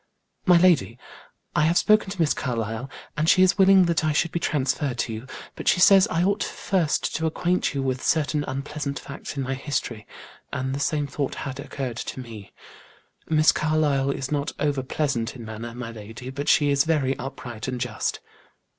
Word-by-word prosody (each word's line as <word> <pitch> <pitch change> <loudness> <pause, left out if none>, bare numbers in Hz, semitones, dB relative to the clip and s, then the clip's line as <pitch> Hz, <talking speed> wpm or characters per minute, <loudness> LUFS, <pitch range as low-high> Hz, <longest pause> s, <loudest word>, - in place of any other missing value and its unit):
"My 180 -1 +7
lady, 170 -9 +3 0.6
I - - +3
have 170 +2 +3
spoken 215 -2 +4
to 195 -1 -7
Miss 160 -3 +3
Carlyle, 115 -1 -3 0.3
and 155 +2 +1
she 185 - +6
is 185 +1 +3
willing 190 -1 +7
that 170 -1 +1
I 155 -1 +1
should 165 +2 +1
be 170 - -1
transferred 135 -3 -1
to 115 - -2
you, 110 +4 -7 0.3
but - - -8
she - - +4
says 195 +2 +7
I 175 -6 0
ought 200 +2 +1
first 175 -7 -1
to 160 0 0
acquaint 175 0 0
you 135 - -1
with 130 -1 -1
certain 150 -1 +1
unpleasant 140 +1 -4
facts 140 +1 -8
in 135 - -1
my 130 +1 -2
history, 130 -5 -4 0.4
and 130 +1 -2
the 140 - -3
same 145 0 0
thought 140 -1 -3
had 135 0 -5
occurred 130 -4 -5
to 130 - -5
me. 110 -5 -9 0.8
Miss 155 -1 +5
Carlyle 150 -3 +1
is 135 0 -3
not 145 -1 -1
over 145 -2 0
pleasant 130 -4 -2
in 120 -3 -9
manner, 115 +2 -7
my 120 -2 -6
lady, 115 +3 -9
but 145 +2 -3
she 145 -1 +4
is 140 -1 +4
very 145 -4 +1
upright 125 -4 -6
and 125 -1 -3
just." 120 -3 -2
140 Hz, 190 wpm, -24 LUFS, 130-160 Hz, 0.8 s, My